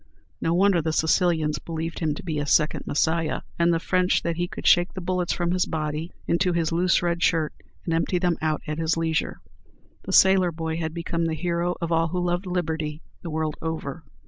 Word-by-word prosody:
No 165 - +1
wonder 190 -1 +4
the 160 0 -1
Sicilians 160 -1 +2
believed 165 0 -5
him 155 -3 0
to - - -8
be 160 -4 -2
a 145 - -3
second 155 +1 +2
Messiah, 160 +1 0 0.2
and 170 0 +4
the 165 - +2
French 180 +2 +1
that 170 -1 -1
he 175 +1 -1
could - - -9
shake 175 0 +4
the - - -3
bullets 180 -1 -1
from 175 -1 0
his 180 0 +1
body 155 +1 -3
into 180 +1 +1
his 170 -1 0
loose 175 +2 +2
red 170 0 0
shirt, 160 -4 +2 0.3
and 165 - -1
empty 165 +2 +1
them 175 -1 +1
out 155 -1 -1
at 155 +1 -4
his 165 0 +1
leisure! 160 -1 -1 0.6
The - - -4
sailor 190 -2 +5
boy 160 0 -3
had 160 -1 -3
become 170 0 -2
the 160 - -1
hero 175 +1 -1
of 170 0 -2
all 165 0 +3
who 180 +2 -2
loved 175 +1 -1
liberty 160 -4 -2 0.2
the 170 - -6
world 155 -1 -2
over. 160 -1 -4
165 Hz, 210 wpm, -25 LUFS, 160-175 Hz, 0.6 s, sailor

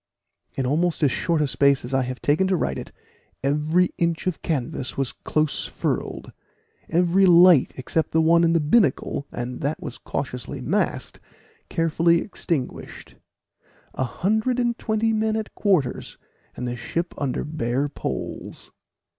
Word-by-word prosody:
In 135 - -1
almost 160 +5 0
as 140 - +4
short 165 +2 0
a - - +1
space 140 -1 +2
as 125 - -7
I 135 - +3
have 130 0 -5
taken 155 +6 +2
to 190 - +2
write 65 - -1
it, - - -9 0.5
every 150 +6 +2
inch 170 -1 0
of 185 -3 -2
canvas 130 -4 -3
was 135 -2 0
close 155 -1 -1
furled - - -3 0.6
every 180 +3 +3
light, 175 -4 +6
except 155 +5 -1
the 160 - +1
one 165 +1 +4
in 165 0 +3
the 165 - +3
binnacle, 150 - +1
and 125 +1 -5
that 145 +3 -1
was 130 -3 -7
cautiously 125 -3 -5
masked, - - -1 0.5
carefully 165 +1 +2
extinguished 165 -9 -4 0.8
a - - -1
hundred 220 - 0
and 240 -1 +1
twenty 220 +1 0
men 220 0 +1
at 220 -1 -4
quarters, 180 - 0 0.4
and 125 - -4
the 120 - -3
ship 170 +8 -3
under 140 -3 -1
bare 140 -2 -1
poles. 140 - -6
160 Hz, 150 wpm, -23 LUFS, 135-180 Hz, 0.8 s, light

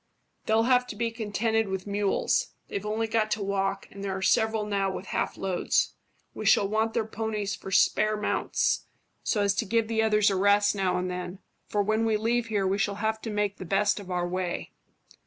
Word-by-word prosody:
"They'll 220 +1 +4
have 250 +1 +3
to - - -6
be 230 +2 -1
contented 225 0 0
with 190 -1 -3
mules. 200 -1 0
They've 200 +1 -4
only 220 +2 0
got 220 -1 0
to 210 - -3
walk, 195 0 -1
and 200 0 -9
there 190 -1 -2
are - - -6
several 220 -1 +2
now 200 -2 0
with 190 - -6
half - - -2
loads. 190 -2 0 0.4
We - - -6
shall 200 - +5
want 220 +2 0
their 225 - +1
ponies 215 -2 -3
for - - -9
spare 215 +3 +3
mounts, 210 - 0 0.3
so 210 -3 +1
as 200 -1 +3
to 205 - 0
give 225 +1 +1
the 225 0 +1
others 210 -2 +3
a - - 0
rest 200 +2 +4
now 190 -3 0
and 180 0 -1
then, 180 +1 -5 0.3
for 205 -1 +1
when 215 +2 +1
we 220 -1 +2
leave 230 +2 0
here 205 -3 0
we 195 +2 +1
shall 200 0 0
have 220 +1 -1
to 225 - -5
make 205 -1 -1
the - - -7
best 195 +4 +1
of 195 -2 -10
our 175 -1 -1
way." 180 -1 -3
205 Hz, 210 wpm, -27 LUFS, 195-220 Hz, 0.4 s, shall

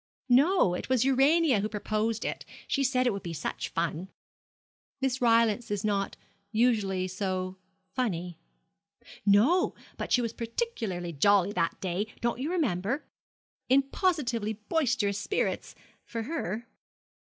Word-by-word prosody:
'No; 275 - +4
it 180 - -4
was 255 -1 +3
Urania 270 0 +4
who 210 +2 -1
proposed 215 +1 -1
it. - - -3 0.2
She 275 - +1
said 255 -1 +2
it 245 - +2
would 195 - -4
be 170 -1 -5
such 155 - -4
fun.' 170 +2 -2 0.9
'Miss 265 -1 -1
Rylance 230 -1 +3
is 205 -1 -2
not 200 -2 -1 0.3
usually 210 -5 +2
so 185 0 -3 0.4
funny.' 180 -9 -2 0.9
'No; 255 - +4 0.2
but - - -5
she - - +5
was 230 -1 -2
particularly 225 - -3
jolly 200 +5 +4
that 170 -4 -1
day, 190 +3 -2
don't 235 0 -1
you 280 +4 -2
remember? 265 - 0 0.6
in 270 +2 +5
positively 240 - 0
boisterous 220 -3 0
spirits 405 - -2 0.3
for 230 -1 -5
her.' 230 - -3
225 Hz, 130 wpm, -29 LUFS, 195-260 Hz, 0.9 s, she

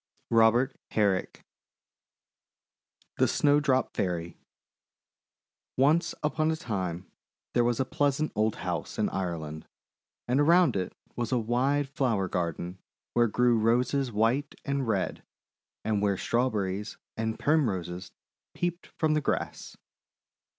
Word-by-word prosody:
ROBEBT 115 +3 +4 0.2
HEBRICK 100 -4 0 1.7
THE - - +5
SNOWDROP 145 -2 +2
FAIRY 90 -3 -1
Irish 85 - -11
Tale - - -35 1.4
ONCE 155 +5 +3
upon 155 +1 +1
a 160 - +1
time, 95 - -4 0.4
there 120 - +3
was 120 -1 +1
a 130 - +2
pleasant 145 +3 0
old 110 0 +1
house 85 -4 -3
in - - +1
Ireland, 80 -5 -4 0.6
and 125 +3 +2
around 170 -2 +5
it 95 -2 -2 0.2
was 120 0 -2
a 125 - +3
wide 130 +5 +1
flower 120 -8 0
gar 85 -2 -1
den 90 +4 -7 0.3
where 120 0 +4
grew 120 +1 +3
Roses 125 +4 +2
white 115 +7 +1
and 140 -3 -1
red, 100 -4 -1 0.6
and 105 -2 +1
where 100 -2 +1
Strawberries 105 -4 -1 0.2
and 110 0 -2
Primroses 95 - 0 0.4
peeped 175 0 -2
from 155 -1 +2
the 155 - +2
grass. - - -3
120 Hz, 125 wpm, -28 LUFS, 95-140 Hz, 1.7 s, THE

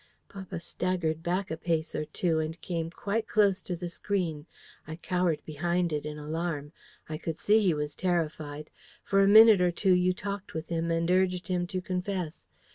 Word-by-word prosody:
"Papa 190 -3 -7
staggered 170 -2 -2
back 180 +3 -1
a 160 - -2
pace 160 -1 -1
or 155 - -2
two, 160 +1 0
and 160 +2 -3
came 165 -2 -3
quite 205 +5 -2
close 200 -3 +3
to 180 - -4
the 175 +1 -5
screen. 170 -4 -2 0.4
I 160 - -5
cowered 175 -1 -1
behind 170 +2 -1
it 150 0 -2
in 150 0 -6
alarm. 150 -1 -3 0.4
I 155 0 -5
could 165 -1 -4
see 210 +5 +4
he 180 -6 +3
was 150 0 -2
terrified. 155 -4 -2 0.3
For 195 0 +3
a 195 - +5
minute 215 -1 +8
or 180 - +4
two 185 +2 +2
you 180 0 +3
talked 200 -1 -5
with 160 0 -5
him, 165 0 -1
and 165 +1 +1
urged 185 -1 +1
him 175 -1 0
to 185 0 -3
confess. 180 -2 -3
175 Hz, 190 wpm, -29 LUFS, 160-185 Hz, 0.4 s, minute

